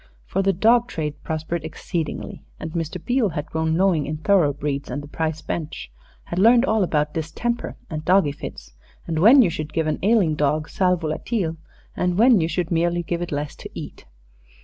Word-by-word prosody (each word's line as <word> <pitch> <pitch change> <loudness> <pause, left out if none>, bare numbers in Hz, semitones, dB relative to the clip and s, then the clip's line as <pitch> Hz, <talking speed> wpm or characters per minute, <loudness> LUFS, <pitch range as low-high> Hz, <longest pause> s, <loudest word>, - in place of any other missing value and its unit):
For 195 - -1
the 195 0 +3
dog 230 +6 +3
trade 150 -8 -4
prospered 160 +1 -3
exceedingly, 160 +1 -5 0.2
and 160 - -5
Mr. 165 +1 -3
Beale 245 -4 +2
had 150 -2 -4
grown 160 0 -1
knowing 180 -6 +2
in 155 +1 -3
thoroughbreeds 145 -5 +1
and 145 - -4
the - - -9
prize 160 +1 -3
bench, 150 - -5 0.3
had 175 - -4
learned 235 +5 +6
all 220 -4 +2
about 150 -4 0
distemper 165 +10 -3
and 155 -1 -5
doggy 185 -4 +4
fits, 65 - -9 0.3
and 160 -2 -2
when 245 - +8
you 180 - +1
should 155 -1 -5
give 160 - 0
an 155 - -1
ailing 200 -6 +3
dog 150 +1 0
sal 180 -1 +2
volatile 165 +2 -2 0.4
and 180 0 0
when 230 -3 +6
you 160 - +1
should 170 0 -2
merely 170 +1 +1
give 170 0 -3
it 175 - -4
less 145 0 -3
to - - -9
eat. - - -8
165 Hz, 190 wpm, -23 LUFS, 155-195 Hz, 0.4 s, when